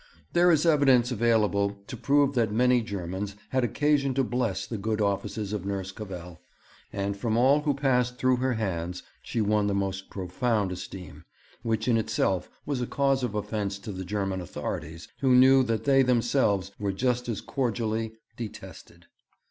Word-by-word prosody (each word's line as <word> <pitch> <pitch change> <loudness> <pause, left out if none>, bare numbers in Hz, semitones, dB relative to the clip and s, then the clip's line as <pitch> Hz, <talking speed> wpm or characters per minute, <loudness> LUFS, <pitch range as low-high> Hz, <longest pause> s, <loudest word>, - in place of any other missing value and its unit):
There 175 +1 +5
is 160 -1 +3
evidence 135 -6 +4
available 105 -3 +2
to - - -7
prove 140 +3 +2
that 115 -5 +1
many 125 +2 +3
Germans 100 -1 -5
had 130 -1 +1
occasion 140 +1 +1
to 135 - +2
bless 120 -5 -1
the 115 - -5
good 110 +1 -1
offices 100 0 -1
of 105 -4 -3
Nurse 95 -1 -3
Cavell; 90 -4 -8 0.5
and 100 0 -2
from 110 +2 -1
all 135 +5 +4
who 145 -2 0
passed 125 -3 +1
through 130 0 +2
her 130 +1 0
hands 90 -5 -3 0.2
she 115 - -2
won 105 0 +2
the 100 - 0
most 95 -1 -2
profound 100 +2 -1
esteem, 90 0 -8 0.4
which 110 -1 -1
in 120 -2 +4
itself 95 -4 0 0.2
was 140 -4 -2
a 120 - -2
cause 135 -1 +1
of 120 -4 -2
offence 105 -1 -2
to 100 +2 -7
the 95 -1 -5
German 95 -1 -2
authorities, 80 -1 -6
who 130 -2 +4
knew 130 +1 +7
that 115 -3 -1
they 135 -1 +5
themselves 120 -6 +2
were 100 -2 -1
just 125 +4 -1
as 110 - -2
cordially 115 -3 -2 0.2
detested. 115 -4 -9
110 Hz, 170 wpm, -27 LUFS, 100-125 Hz, 0.5 s, knew